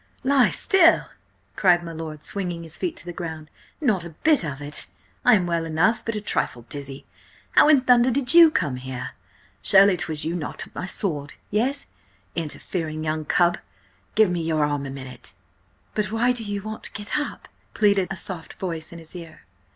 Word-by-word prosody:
"Lie 270 -1 +4
still?" 370 -4 +4 0.5
cried 175 -3 +4
my 170 - -6
lord, 155 -2 -7
swinging 175 -4 -3
his 165 0 -7
feet 350 -2 -3
to - - -8
the 175 - -6
ground. 160 -3 -7 0.3
"Not 215 - +1
a 170 - -7
bit 310 - +5
of 140 -4 -4
it! 145 0 -4 0.4
I - - +7
am 185 -4 +1
well 170 -1 0
enough, 165 +8 +1
but 230 - -3
a 210 - -3
trifle 120 - -1
dizzy. 140 -1 -6 0.5
How - - +6
in 290 -4 +6
thunder 250 -1 +5
did 255 +2 +1
you 335 -1 +9
come 155 - -1
here? 125 0 -6 0.5
Surely 195 0 +6
'twas 155 -3 -2
you 165 +2 -1
knocked 160 -4 -5
up - - -22
my 185 - -5
sword? 150 -8 -2 0.2
Yes? 255 +7 0 0.5
Interfering 155 0 -4
young 155 0 -2
cub! 175 +2 +2 0.6
Give 215 -4 +5
me 175 -1 -1
your 160 -2 +1
arm 145 -1 -2
a - - -6
minute!" 130 -1 -8 0.6
"But 210 -2 -1
why 235 +3 +2
do 245 -2 -1
you 205 -2 -4
want 215 0 -6
to - - -7
get 210 +7 -2
up?" 295 - -6 0.3
pleaded 200 -3 +3
a 190 - -3
soft 180 -2 -7
voice 165 -4 -5
in 170 - -9
his 165 +1 -13
ear. 165 -2 -10
175 Hz, 190 wpm, -24 LUFS, 155-220 Hz, 0.6 s, you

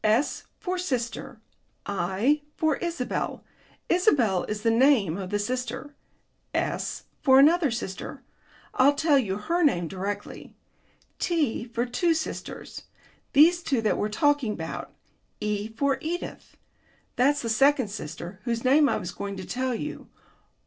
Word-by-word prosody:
"S 220 +6 +1
for 370 -3 -2
sister. 250 -6 -3 0.5
I 200 +10 +1 0.2
for 315 -2 +2
Isabel 330 -8 -3 0.4
Isabel 265 - +3
is 210 0 -4
the 230 - +3
name 230 - +4
of 190 -1 -5
the 205 - 0
sister. 255 +5 -3 0.6
S - - -2 0.2
for 265 -2 +6
another 310 +3 +6
sister 225 -5 -5 0.5
I'll 280 +3 +4
tell 295 -1 +4
you 195 -6 -1
her 335 +12 -1
name 175 - +2
directly. 200 +3 -6 0.6
T 300 -10 0
for 235 0 -2
two 325 +7 +1
sisters, 320 - -6 0.5
these 335 +5 +6
two 270 -7 0
that 215 - +1
we're 210 - 0
talking 290 -1 +2
about. 160 -3 -6 0.5
E 210 0 -2
for 270 +5 0
Edith, 345 +3 -5 0.6
that's 285 +3 +2
the - - -2
second 265 +1 +3
sister 175 -1 -7
whose 235 -2 -1
name 280 +3 +5
I - - +1
was 175 - -5
going 200 -1 -5
to 190 - -6
tell 255 0 -1
you. 300 +6 -6
250 Hz, 140 wpm, -26 LUFS, 210-290 Hz, 0.6 s, for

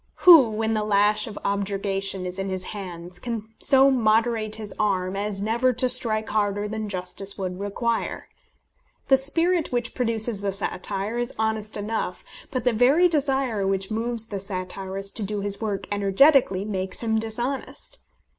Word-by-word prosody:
Who, 325 -10 +9
when 220 +1 -1
the 215 -1 0
lash 210 0 +2
of 210 - -8
objurgation 195 -1 -1
is 180 +1 -6
in 195 0 -2
his 185 -1 -3
hands, 180 -3 -7
can 225 -1 -5
so 270 0 +5
moderate 225 -2 +1
his 215 -2 -7
arm 190 -3 0
as 200 0 -3
never 235 +4 +2
to 255 - +3
strike 220 -3 +3
harder 205 -1 0
than 215 0 -4
justice 190 +1 -4
would 185 -1 -4
require? 225 +3 -2 0.8
The 270 - +7
spirit 330 +5 +1
which 240 -1 -2
produces 230 -3 -1
the 200 -1 -2
satire 200 +3 -3
is 240 +1 -2
honest 220 -1 -1
enough, 215 +2 -3 0.2
but 255 -5 -3
the 245 - +2
very 270 +10 +5
desire 270 - 0
which 195 +1 -1
moves 230 +1 -2
the 205 -3 -5
satirist 195 0 -5
to - - -5
do 205 0 -3
his 200 +1 -3
work 205 -3 -3
energetically 205 0 +4
makes 190 -3 -4
him 220 -1 +1
dishonest. 245 - -5
215 Hz, 160 wpm, -24 LUFS, 195-235 Hz, 0.8 s, Who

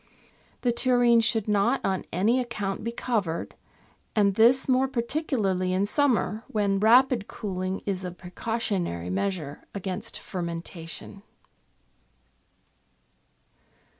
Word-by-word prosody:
The 245 - +2
tureen 240 -1 +4
should 225 -1 +1
not 205 -1 +2
on 190 -1 -1
any 215 +9 +2
account 210 -6 -3
be 230 - -2
covered, 210 -9 -2 0.6
and 200 -2 +4
this 235 +6 +5
more 260 0 +3
particularly 235 - -1
in 190 +2 +2
summer, 230 -3 +1
when 200 -2 0
rapid 240 +1 +4
cooling 185 -2 -4
is 190 -2 -2
a 180 - -3
precautionary 180 - -3
measure 155 - -2
against 195 +3 -4
fer 185 - -6
mentation. 170 +2 -6
205 Hz, 105 wpm, -26 LUFS, 185-235 Hz, 0.6 s, this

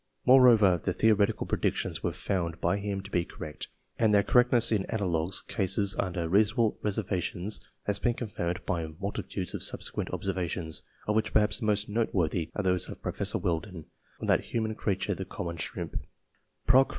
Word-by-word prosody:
Moreover, 115 -8 +7
the 90 - 0
theoretical 110 0 +2
predictions - - -1
were - - 0
found 85 -3 -2
by 85 +3 +1
him 100 -1 -3
to 100 +1 -11
be 90 - +2
correct, 80 -3 -7 0.3
and 110 -2 +4
their 100 -1 +5
correctness 125 0 +4
in 105 -3 +2
analogous 90 -5 0
cases 100 0 +1
under 90 -3 -2
reasonable 110 +5 +2
reservations 100 -1 -1 0.2
has 100 -1 0
been 120 -1 +1
confirmed 90 -8 -3
by 85 -3 -1
multitudes 100 -1 -4
of - - -4
subsequent - - -2
observations, 90 -4 -2 0.3
of 105 - +1
which 110 0 0
perhaps 105 -1 +3
the 110 - -2
most 105 0 +2
noteworthy 95 -7 0
are 105 - -1
those 90 -1 +1
of - - -9
Professor - - -1
Weldon, 85 -1 -3 0.3
on - - -4
that - - +1
humble 110 -2 0
creature 100 -3 -1
the - - -5
common 85 -1 -5
shrimp - - -4 0.7
(Proc. 130 +2 +5
100 Hz, 165 wpm, -29 LUFS, 90-110 Hz, 0.7 s, Moreover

